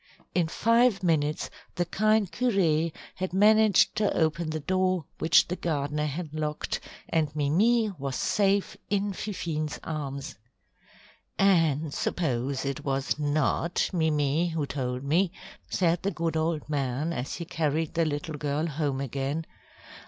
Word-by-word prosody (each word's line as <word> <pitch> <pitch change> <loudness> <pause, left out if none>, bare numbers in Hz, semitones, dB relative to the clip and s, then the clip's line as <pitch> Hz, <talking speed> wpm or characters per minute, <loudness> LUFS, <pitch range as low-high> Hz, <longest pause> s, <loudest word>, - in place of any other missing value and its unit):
In 175 -3 +2
five 230 +2 +3
minutes 155 -3 +1 0.2
the 175 - 0
kind 215 +1 +2
curé 170 -7 +2 0.3
had 185 -1 -3
managed 215 0 +5
to 210 -1 +2
open 160 0 +1
the 155 0 -2
door 185 0 0
which 160 - +5
the 180 - -2
gardener 150 -3 -1
had 155 +1 -5
locked, 155 -1 -2 0.3
and 160 -2 +1
Mimi 210 +10 +3
was 135 -1 -3
safe 200 -1 +1
in 200 0 0
Fifine's 165 -7 -3
arms. 140 -2 -5 1.0
"And 160 -6 +3
suppose 135 -4 -1
it 140 -1 -3
was 135 +1 -1
not 150 +3 +1
Mimi 155 -1 +1
who 160 -3 -1
told 125 -2 -3
me?" 170 +6 +2 0.4
said 175 -2 +1
the 195 - 0
good 165 -3 -2
old 160 -1 -1
man 145 +2 -1
as 125 -1 -4
he 170 - -5
carried 160 -2 -1
the 165 +1 +2
little 155 +1 -3
girl 145 +2 -1
home 145 -4 -1
again. 140 +4 -2
160 Hz, 135 wpm, -27 LUFS, 145-180 Hz, 1.0 s, managed